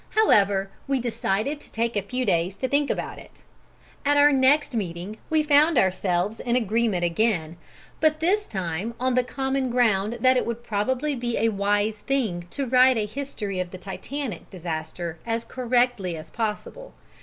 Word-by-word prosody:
However, 200 - +3 0.2
we 270 -1 +1
decided 240 +4 -1
to - - -14
take 230 0 -1
a 205 - +1
few 250 +6 -3
days 175 +1 +1
to 260 - -2
think 285 +1 +1
about - - -3
it. - - -17 0.6
At 290 +1 +3
our 290 +1 +7
next 275 +2 +3
meeting 195 0 -4
we 315 -1 +3
found 300 +1 +4
ourselves 190 +1 +1
in 240 -1 -1
agreement 220 -5 +1
again, 170 -3 0 0.4
but 310 0 +2
this 405 +6 +1
time 190 +4 -3
on 255 +1 +1
the 250 0 +3
common 265 +1 -2
ground 225 -4 +2
that 255 0 +5
it - - +1
would 235 0 -4
probably 255 +8 -1
be 240 -2 -2
a 225 - +2
wise 205 +1 0
thing 210 -9 -1
to 280 +6 -3
write 255 0 +5
a 215 - 0
history 210 -5 -5
of 180 -1 -2
the 185 - -8
Titanic 210 - -6
disaster 165 -1 -5
as 230 0 -2
correctly 245 -8 0
as 155 - -10
possible. 235 - -4
230 Hz, 170 wpm, -25 LUFS, 195-265 Hz, 0.6 s, our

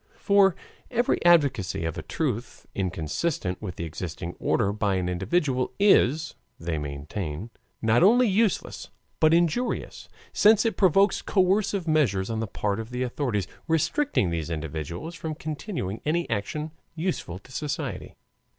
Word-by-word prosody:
For 200 -3 +4 0.3
every 240 0 +1
advocacy 140 - +3
of 80 - -2
a - - -4
truth 120 - -3
inconsistent 90 - -2
with 95 -6 -5
the - - -5
existing 85 +1 -5
order 100 -3 +1
by 105 -2 0
an 90 -1 -1
individual 130 - 0
is, 160 -6 +4 0.3
they 80 -1 -2
maintain, 75 +7 -5 0.3
not 110 +2 +4
only 240 +6 +6
useless 210 0 0 0.3
but 155 - +5
injurious, 175 +9 0 0.2
since 215 +1 +5
in 225 - +2
provokes 195 +1 +3
coercive 190 -1 +1
measures 115 -11 +2
on 110 - -2
the 115 - -2
part 100 +1 -2
of 110 0 -6
the 125 +1 -2
authorities, 120 -7 -1 0.2
restricting 165 - +1
these 85 -1 -3
individuals 80 - -5
from 160 -2 -5
continuing 150 - -4
any 170 +3 0
action 150 +9 -2 0.2
useful 160 - -3
to 100 +7 -17
society. 145 +3 -4
125 Hz, 140 wpm, -26 LUFS, -, 0.3 s, only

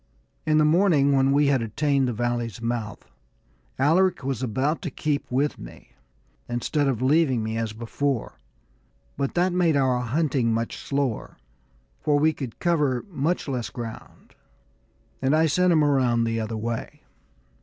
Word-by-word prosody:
In 155 0 +3
the 155 - +4
morning, 155 -4 +4
when 135 0 +3
we 145 +1 +3
had 140 -3 +2
attained 135 +4 0
our 120 - -3
valley's 120 -1 -2
mouth, 115 -3 -4 0.7
Alaric 170 +5 +2
was 135 -2 -2
about 130 +6 -1
to 170 - -3
keep 145 +1 -2
with 140 +4 0
me, - - -12 0.6
instead 140 +5 0
of 130 -3 -1
leaving 135 -4 +3
me 110 0 -3
as 115 -1 -2
before; 120 +3 -3 0.8
but 140 - -2
that 175 +1 +2
made 175 -4 +2
our 130 -2 +2
hunting 130 -1 0
much 115 +1 -2
slower, 140 -5 -3 0.6
for 150 -2 +2
we 155 +2 +3
could 130 -7 -7
cover 150 -8 0
much 160 +3 -1
less 125 -4 -3
ground, 115 -3 -9 0.9
and 135 +3 +2
I 160 +1 +4
sent 180 +4 +2
him 155 -3 +4
around 130 -5 +2
the 115 0 -1
other 110 0 -3
way. 115 +1 -5
135 Hz, 155 wpm, -25 LUFS, 120-150 Hz, 0.9 s, the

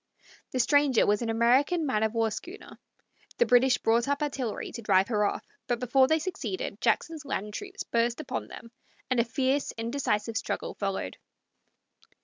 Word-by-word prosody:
The 255 - -3
stranger 285 -1 +4
was 205 +2 +2
an 235 - -2
American 260 +9 +3
man 255 -7 0
of 220 +1 0
war 225 -1 +1
schooner. 360 - -9 0.6
The 480 - +4
British 250 - +4
brought 230 +2 +2
up 285 +1 0
artillery 265 -6 -3
to 235 - -7
drive 195 -2 +3
her 210 -3 +1
off, - - -2 0.2
but 240 -1 0
before 260 +2 +3
they 315 - +3
succeeded 370 +3 -4
Jackson's 320 -2 0
land 210 -7 -4
troops 390 - -6
burst 235 +2 0
upon 310 - -4
them, 230 -1 -11 0.4
and 255 - +2
a - - +5
fierce, 265 +4 0
indecisive 230 -2 -1
struggle - - -3
followed. 195 - -3
245 Hz, 165 wpm, -28 LUFS, 225-285 Hz, 0.6 s, a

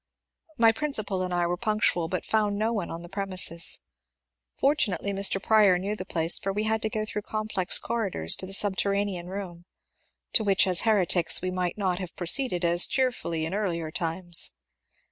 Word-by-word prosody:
My 230 -2 +5
principal 220 -7 -1
and 185 0 -3
I 175 -1 0
were 175 +1 -2
punctual, 210 -6 0
but 185 +1 -4
found 210 -2 0
no 220 +2 0
one 205 -6 -3
on 165 +1 -7
the - - -9
premises. 185 -3 +1 0.8
For 280 - +3
tunately 200 -7 -1
Mr. 195 0 +2
Prior 205 -3 +4
knew 200 +4 -3
the 185 - -7
place, 165 -2 +1
for 195 - -3
we 210 +2 -2
had 220 0 -1
to 220 - -2
go 215 0 -3
through 210 0 -5
complex 215 -3 0
corridors 200 - -2
to 185 - -6
the 195 - -5
subterranean 200 -2 0
room, 180 -3 -7 0.3
— - - -47
to 220 - +3
which 200 -2 +3
as 185 -2 +4
heretics 185 -6 +2
we 185 - -2
might 180 0 -3
not 185 -3 -1
have 185 -3 -7
proceeded 180 0 +1
as 170 +1 +5
cheerfully 240 -12 -1
in 165 - -4
earlier 170 -6 -3
times. 170 +1 +1
195 Hz, 185 wpm, -26 LUFS, 175-215 Hz, 0.8 s, My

